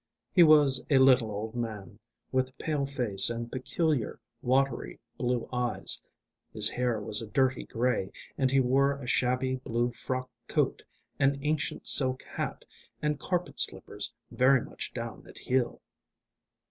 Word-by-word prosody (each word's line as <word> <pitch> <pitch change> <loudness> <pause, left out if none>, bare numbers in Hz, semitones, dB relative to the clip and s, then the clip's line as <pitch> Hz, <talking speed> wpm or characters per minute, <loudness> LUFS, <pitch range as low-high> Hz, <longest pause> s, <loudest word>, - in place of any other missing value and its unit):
He 180 - +5
was 150 -5 +6
a 140 - +5
little 130 -4 +5
old 105 +2 -5
man, 110 -4 -6 0.3
with 130 0 -1
pale 150 -3 -2
face 120 -9 +3
and 120 0 -5
peculiar 140 -1 -1 0.2
watery 130 - 0 0.2
blue 125 -1 -1
eyes; 125 -2 +1 0.5
his 105 -1 +4
hair 125 -3 -1
was 105 +1 +2
a 115 - -6
dirty 130 +1 +1
grey, 120 -5 -1 0.2
and 130 -1 +1
he 135 +1 +3
wore 135 +2 +3
a 140 - -9
shabby 130 +1 0
blue 120 -1 -1
frock 130 +2 -4 0.2
coat, - - 0 0.4
an 140 +1 +3
ancient 150 0 -2
silk 130 -2 +4
hat, - - -5 0.3
and 150 -1 -1
carpet 180 +2 -3
slippers - - -2 0.2
very 130 0 +4
much - - -7
down - - -6
at - - -13
heel. 125 -2 -1
130 Hz, 145 wpm, -29 LUFS, 120-135 Hz, 0.5 s, was